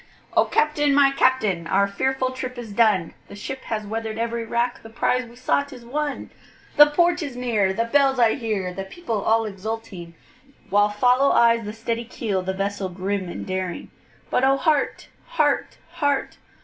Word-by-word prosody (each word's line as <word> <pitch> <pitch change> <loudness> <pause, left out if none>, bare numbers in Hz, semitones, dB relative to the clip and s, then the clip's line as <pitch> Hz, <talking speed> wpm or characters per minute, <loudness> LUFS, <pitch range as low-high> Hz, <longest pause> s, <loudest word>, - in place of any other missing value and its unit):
O - - +5
CAPTAIN! 295 -2 +2
my 280 -1 +5
Captain, 215 -11 +1
our 200 +3 +2
fearful 260 +5 -1
trip 255 -1 -6
is 235 -3 -7
done, 205 -6 +2
The - - -11
ship 265 +6 -6
has 215 -2 -3
weather'd 220 +1 -4
every 230 0 -2
rack, 235 +2 -1
the 225 - -12
prize 250 +2 0
we 235 +1 -15
sought 280 +3 0
is 250 -3 -11
won, 290 +3 -3 0.4
The 295 0 +9
port 345 +4 +2
is 285 -5 -5
near, 225 -6 +1
the 220 +4 0
bells 270 +2 +3
I 230 -2 +4
hear, 210 -8 -3
the 195 +2 -5
people 225 - -4
all 225 +2 +2
exulting, 195 -4 -6 0.6
While 205 +1 +4
follow 250 +6 +3
eyes 230 -1 +4
the 210 - -4
steady 230 +1 -3
keel, 215 -5 -2
the 185 +1 -2
vessel 195 0 -3
grim 190 +1 -3
and - - -6
daring; 185 -2 -4 0.4
But 250 - +2
O 270 +1 +4
heart! 300 -1 0 0.2
heart! - - +1
heart! 285 -3 -1
230 Hz, 175 wpm, -23 LUFS, 200-265 Hz, 0.6 s, The